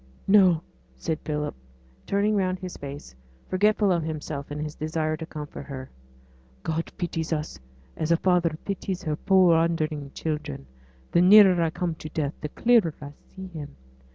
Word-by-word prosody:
'No!' 185 Hz, -5 st, +5 dB, 0.3 s
said 160 Hz, -2 st, -3 dB
Philip, 150 Hz, -1 st, -2 dB, 0.5 s
turning 205 Hz, +2 st, +2 dB
round 185 Hz, -2 st, +1 dB
his 185 Hz, -1 st, -7 dB
face, 140 Hz, -, -8 dB, 0.3 s
forgetful 205 Hz, +1 st, +3 dB
of 170 Hz, -2 st, +2 dB
himself 155 Hz, -2 st, -5 dB
in 145 Hz, -, -4 dB
his 150 Hz, 0 st, -4 dB
desire 155 Hz, 0 st, -1 dB
to 160 Hz, 0 st, -7 dB
comfort 150 Hz, -3 st, -8 dB
her. 130 Hz, -2 st, -7 dB, 0.7 s
'God 160 Hz, +1 st, -2 dB
pities 165 Hz, -2 st, -3 dB
us 150 Hz, -, -3 dB, 0.4 s
as 160 Hz, +1 st, -2 dB
a 170 Hz, -, +5 dB
father 175 Hz, -3 st, +2 dB
pities 195 Hz, -1 st, -3 dB
his 155 Hz, -3 st, -2 dB
poor 185 Hz, -3 st, +6 dB
wandering 160 Hz, -3 st, 0 dB
children; 150 Hz, -, -4 dB, 0.5 s
the 170 Hz, -, +4 dB
nearer 190 Hz, -1 st, +8 dB
I 165 Hz, -, +2 dB
come 170 Hz, +1 st, -2 dB
to 155 Hz, 0 st, -9 dB
death 150 Hz, -2 st, -2 dB
the 150 Hz, -, -4 dB
clearer 225 Hz, -5 st, +3 dB
I 145 Hz, 0 st, -9 dB
see 190 Hz, 0 st, -9 dB
Him. 155 Hz, -, -8 dB
165 Hz, 160 wpm, -26 LUFS, 150-185 Hz, 0.7 s, nearer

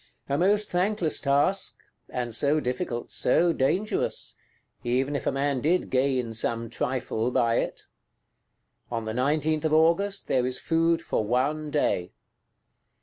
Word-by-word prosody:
A 140 Hz, -, 0 dB
most 205 Hz, +6 st, +2 dB
thankless 180 Hz, -2 st, +1 dB
task; 145 Hz, +8 st, +1 dB, 0.3 s
and 120 Hz, -2 st, -3 dB
so 145 Hz, +6 st, +2 dB
difficult, 125 Hz, -2 st, -3 dB
so 170 Hz, +6 st, +2 dB
dangerous,—even 135 Hz, -, -2 dB
if -, -, -3 dB
a -, -, +3 dB
man 135 Hz, -1 st, 0 dB
did 170 Hz, +6 st, +1 dB
gain 130 Hz, -3 st, +1 dB
some 115 Hz, +1 st, -1 dB
trifle 120 Hz, -2 st, -1 dB
by 115 Hz, -2 st, +2 dB
it! -, -, -3 dB, 1.0 s
On 115 Hz, -2 st, -3 dB
the 110 Hz, -, -3 dB
19th 150 Hz, +4 st, +1 dB
August, 170 Hz, +6 st, +2 dB
there 125 Hz, -1 st, +1 dB
is 130 Hz, -, -1 dB
food 165 Hz, 0 st, +1 dB
for -, -, -1 dB
one 140 Hz, +7 st, 0 dB
day. 95 Hz, -11 st, 0 dB
140 Hz, 130 wpm, -26 LUFS, 125-165 Hz, 1.0 s, a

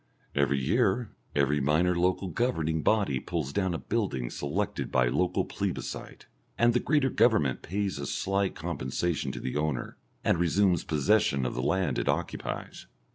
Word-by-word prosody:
Every 70 Hz, -1 st, +2 dB
year 95 Hz, -, +1 dB, 0.2 s
every 75 Hz, +1 st, +2 dB
minor 80 Hz, +6 st, +2 dB
local 90 Hz, +2 st, +1 dB
governing 80 Hz, -7 st, 0 dB
body 95 Hz, -9 st, +2 dB
pulls 80 Hz, -5 st, -3 dB
down 95 Hz, -3 st, 0 dB
a -, -, 0 dB
building 80 Hz, -, -2 dB
selected 90 Hz, +8 st, -2 dB
by 65 Hz, -1 st, +3 dB
local 90 Hz, +7 st, +1 dB
plebiscite, -, -, -5 dB, 0.3 s
and 120 Hz, 0 st, +4 dB
the 125 Hz, -, +3 dB
greater 140 Hz, -2 st, +2 dB
Government 75 Hz, -, +3 dB
pays 95 Hz, -2 st, -2 dB
a 70 Hz, -, -4 dB
slight 95 Hz, 0 st, 0 dB
compensation 80 Hz, 0 st, -2 dB
to -, -, -6 dB
the 65 Hz, -, -3 dB
owner, 75 Hz, -4 st, -2 dB, 0.3 s
and -, -, +2 dB
resumes 90 Hz, 0 st, +3 dB
possession 75 Hz, -3 st, +2 dB
of -, -, -2 dB
the 65 Hz, -, -2 dB
land 80 Hz, -1 st, +1 dB
it -, -, -1 dB
occupies. -, -, -3 dB
85 Hz, 155 wpm, -28 LUFS, 70-100 Hz, 0.3 s, and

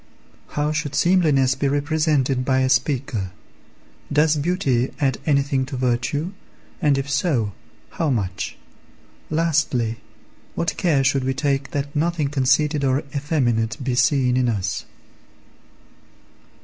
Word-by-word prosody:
How 150 Hz, +1 st, +1 dB
should 150 Hz, -2 st, -2 dB
seemliness 155 Hz, -8 st, +3 dB
be 135 Hz, +1 st, -1 dB
represented 145 Hz, -2 st, +1 dB
by 130 Hz, 0 st, +2 dB
a 130 Hz, -, +2 dB
speaker? 125 Hz, -6 st, 0 dB, 0.8 s
Does 150 Hz, +2 st, +3 dB
beauty 145 Hz, -6 st, 0 dB
add 135 Hz, -3 st, +1 dB
anything 140 Hz, -2 st, +2 dB
to 135 Hz, -1 st, -5 dB
virtue, 125 Hz, +7 st, -1 dB, 0.5 s
and, 145 Hz, -4 st, +3 dB
if 135 Hz, 0 st, -2 dB
so, 135 Hz, -, 0 dB, 0.4 s
how 160 Hz, -, -1 dB
much? 95 Hz, -, -2 dB, 0.7 s
Lastly, 155 Hz, -8 st, +1 dB, 0.6 s
what 170 Hz, -, -1 dB
care 150 Hz, -6 st, +2 dB
should 135 Hz, -1 st, +2 dB
we 130 Hz, 0 st, -1 dB
take 140 Hz, -1 st, 0 dB
that 145 Hz, +1 st, -4 dB
nothing 155 Hz, -1 st, 0 dB
conceited 140 Hz, +2 st, +2 dB
or 135 Hz, +1 st, +1 dB
effeminate 120 Hz, -7 st, 0 dB
be 130 Hz, -1 st, -1 dB
seen 125 Hz, 0 st, +3 dB
in 125 Hz, -1 st, +2 dB
us? 95 Hz, -5 st, -2 dB
140 Hz, 125 wpm, -22 LUFS, 130-150 Hz, 0.8 s, seemliness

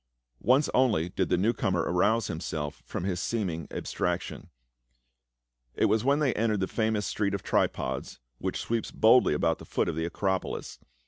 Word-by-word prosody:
Once 135 Hz, +4 st, +3 dB
only 110 Hz, -10 st, +2 dB
did 95 Hz, 0 st, -1 dB
the -, -, +3 dB
new 105 Hz, +6 st, +2 dB
comer 90 Hz, -7 st, 0 dB
arouse 105 Hz, +6 st, +2 dB
himself 75 Hz, -5 st, -4 dB
from -, -, -4 dB
his 90 Hz, -2 st, -1 dB
seeming 90 Hz, -7 st, -2 dB
abstraction; 90 Hz, +1 st, -3 dB, 1.3 s
it -, -, +2 dB
was 110 Hz, +2 st, +2 dB
when 140 Hz, +2 st, +3 dB
they 145 Hz, -4 st, +2 dB
entered 110 Hz, -1 st, +1 dB
the 95 Hz, -, +1 dB
famous 110 Hz, -2 st, 0 dB
street 100 Hz, -2 st, -1 dB
of 95 Hz, -, -6 dB
Tripods, -, -, -1 dB, 0.2 s
which -, -, -2 dB
sweeps 115 Hz, -1 st, -2 dB
boldly 110 Hz, -7 st, +5 dB
about 80 Hz, +2 st, +1 dB
the -, -, -10 dB
foot -, -, -1 dB
of 85 Hz, -, -2 dB
the 80 Hz, +1 st, -1 dB
Acropolis. 95 Hz, +2 st, -2 dB
100 Hz, 170 wpm, -28 LUFS, 85-115 Hz, 1.3 s, boldly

